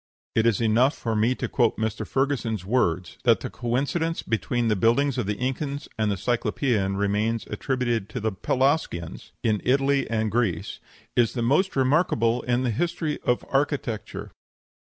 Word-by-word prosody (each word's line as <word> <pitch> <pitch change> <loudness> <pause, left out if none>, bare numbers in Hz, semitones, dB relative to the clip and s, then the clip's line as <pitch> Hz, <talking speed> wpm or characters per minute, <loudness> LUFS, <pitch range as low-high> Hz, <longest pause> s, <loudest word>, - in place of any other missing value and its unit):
It 110 +1 +3
is 115 -4 +2
enough 120 +5 +3
for 115 -2 -2
me 115 +4 +2
to - - -3
quote 120 -4 +1
Mr. 110 -1 -2
Ferguson's 125 -8 -1
words, 95 -6 0
that - - +4
the - - -5
coincidence 140 +8 -1
between 115 +2 -1
the 110 - +2
buildings 120 +6 +2
of 110 - -1
the 105 - 0
Incas 140 +3 -3
and 110 -1 0
the 100 - -1
Cyclopean 110 -3 0
remains 105 +3 0
attributed 120 -2 -1
to - - -4
the 110 +1 -1
Pelasgians 125 - -1
in 110 -3 +1
Italy 135 +1 +2
and 110 -1 0
Greece 110 -6 -1 0.4
"is 120 -2 +3
the 120 - -2
most 155 +11 +2
remarkable 130 -4 +2
in 125 +1 0
the 125 - +1
history 165 +4 -1
of 125 - 0
architecture." 135 -6 -2
120 Hz, 160 wpm, -25 LUFS, 110-135 Hz, 0.4 s, that